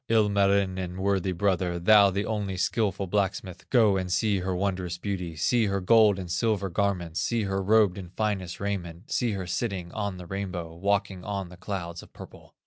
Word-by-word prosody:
"Ilmarinen, 100 -4 +2
worthy 95 -1 +1
brother, 90 -1 0
Thou 100 +3 +6
the 100 +2 -2
only 105 -4 -2
skilful 100 0 0
blacksmith, 95 -1 -2
Go 110 -6 +4
and 90 -1 -3
see 100 +1 +1
her 90 0 -2
wondrous 90 -2 -2
beauty, 90 -3 -4
See 110 +8 +2
her 100 0 0
gold 105 +1 +5
and 90 -3 -6
silver 100 +1 0
garments, 90 -4 -1
See 115 -2 0
her 95 -1 -1
robed 100 -1 +3
in 90 -2 -8
finest 100 -5 -2
raiment, 95 -2 -5
See 120 -3 +1
her 95 -2 -4
sitting 90 -2 -3
on 100 -3 -3
the 90 - -9
rainbow, 90 -3 -5
Walking 100 +1 -1
on 100 -3 -4
the 90 - -12
clouds 90 -2 -5
of - - -17
purple. - - -13
95 Hz, 180 wpm, -27 LUFS, 90-100 Hz, -, Thou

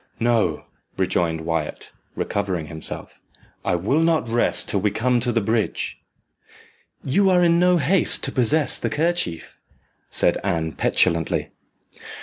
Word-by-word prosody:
"No," 115 -2 +1 0.3
rejoined 80 -2 0
Wyat, 80 -2 -4 0.2
recovering 95 -5 -2
himself; 80 0 -7 0.4
"I - - 0
will 105 - 0
not 165 -5 +1
rest 120 +1 +2
till 100 - +2
we 105 - +2
come 120 +4 0
to 120 +1 0
the 115 -1 0
bridge." 110 +1 -2 1.0
"You 195 +9 +2
are 180 -1 +4
in 170 0 +3
no 180 0 +4
haste 170 +4 +3
to - - 0
possess 135 +5 +1
the - - -2
kerchief," 155 - -2 0.5
said - - +1
Anne 80 -1 -1
petulantly. 80 0 0
115 Hz, 130 wpm, -22 LUFS, -, 1.0 s, are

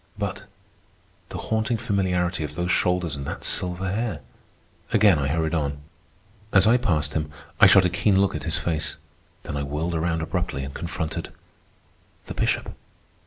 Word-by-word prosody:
But - - -4 0.8
the - - -6
haunting 110 +1 0
familiarity 90 -6 0
of 75 0 -6
those 90 +2 -1
shoulders 90 -5 +1
and 70 - -5
that - - -5
silver 90 +1 +1
hair! 115 +3 -2 0.7
Again 100 -7 +5
I 70 - 0
hurried 80 +2 0
on. 70 -3 -1 0.7
As 95 - +5
I 115 +3 +6
passed 75 - 0
him, 75 -1 -1 0.3
I - - +9
shot 95 -2 +7
a - - +3
keen 95 +2 +3
look 100 0 +2
at 75 - -4
his 80 - -1
face; 80 -3 -1 0.5
then - - -5
I 70 - -1
whirled 75 +5 -2
around 80 0 0
abruptly 80 -4 -2
and 70 +1 -6
confronted—the 80 +4 -8
Bishop. - - -1
85 Hz, 160 wpm, -24 LUFS, 75-95 Hz, 0.8 s, I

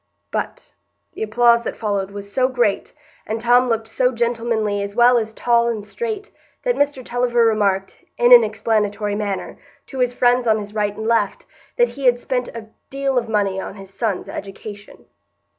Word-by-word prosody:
But - - -5 0.4
the - - -9
applause 235 +2 +4
that - - -5
followed 200 -3 -2
was 200 0 -9
so 255 -1 +3
great, 240 -6 0 0.4
and 220 +1 -2
Tom 245 +2 +4
looked 225 -1 0
so 250 +3 +1
gentlemanly 230 -3 -1
as 200 0 -5
well 240 0 +5
as 220 -1 -4
tall 235 +1 +2
and 220 -3 -3
straight, 430 - -5 0.3
that - - +2
Mr 285 -3 0
Tulliver 240 -1 +1
remarked, 200 -3 0
in 240 +1 +6
an 240 -1 +10
explanatory 210 -1 -1
manner, 205 -2 -4 0.3
to 265 - -8
his 250 -1 +2
friends 245 0 +2
on 220 -1 +4
his 205 -1 -7
right 205 -1 -1
and 220 - -5
left, 230 0 0 0.3
that 485 0 +4
he 275 - -7
had 245 -1 +5
spent 250 0 -2
a 220 -2 -9 0.2
deal 275 -1 0
of 230 -1 -7
money 200 -3 0
on - - -7
his 195 -1 -12
son's 205 -2 -2
education. 205 +1 -9
230 Hz, 180 wpm, -20 LUFS, 210-245 Hz, 0.4 s, an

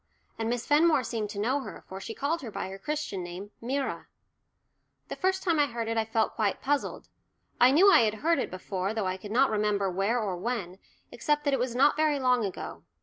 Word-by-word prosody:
And 225 0 -1
Miss 240 0 -2
Fenmore 305 -2 +4
seemed 225 -3 -3
to 205 - -6
know 255 +7 +1
her, 230 -8 -8
for 190 +1 -8
she 225 - -6
called 320 +4 -1
her 245 - -6
by 200 - -5
her 195 +1 -8
Christian 300 -10 -3
name 180 +4 -8
"Myra." 270 +4 -3 1.0
The - - -4
first 380 0 0
time 335 -5 +2
I 290 - +4
heard 235 -3 -4
it 230 - -1
I 225 -1 +1
felt 225 0 0
quite 210 -3 0
puzzled. 285 +1 -2 0.5
I 245 - +7
knew 360 +9 +6
I - - +8
had 220 -2 +2
heard 325 +7 +1
it - - -2
before, 185 +2 -3
though 220 -3 -1
I 185 0 -1
could 205 +2 -9
not 255 +4 +3
remember 205 -2 +1
where 200 +6 +1
or 200 -5 -2
when, 190 -3 -4 0.3
except 295 -1 0
that 285 -1 +1
it 270 - +2
was 245 -1 -2
not 275 +3 +4
very 305 -1 +2
long 250 -3 +2
ago. 195 -3 -5
230 Hz, 225 wpm, -28 LUFS, 205-285 Hz, 1.0 s, I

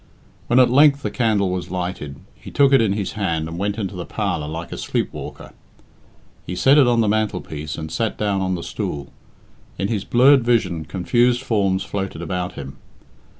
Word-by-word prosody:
When 120 - +2
at 125 -2 +6
length 140 +1 +5
the - - -2
candle 105 -6 +1
was 90 -1 -4
lighted, 90 -6 -4 0.2
he - - -12
took 140 -1 +3
it 135 - +6
in 105 -3 +2
his 100 -2 -3
hand 85 -7 -2
and 85 +1 -6
went 100 +1 -1
into 100 -3 -3
the 90 - -4
parlour 75 -3 -3
like 80 +2 -6
a - - -5
sleepwalker. - - -4 0.9
He 90 - -5
set 135 +9 +5
it 135 - +5
on 120 -1 +3
the 110 - +1
mantelpiece, 100 -8 -2
and 80 -1 -6
sat 110 +6 -2
down 100 -2 0
on 95 -1 0
the 85 - -6
stool. 70 -1 -5 0.7
In 100 - -2
his 105 -4 -1
blurred 130 +2 +5
vision 95 -9 +1
confused 120 +8 +1
forms 100 -6 +1
floated 95 -4 -4
about 90 +1 -3
him. 70 0 -8
100 Hz, 190 wpm, -21 LUFS, 90-120 Hz, 0.9 s, at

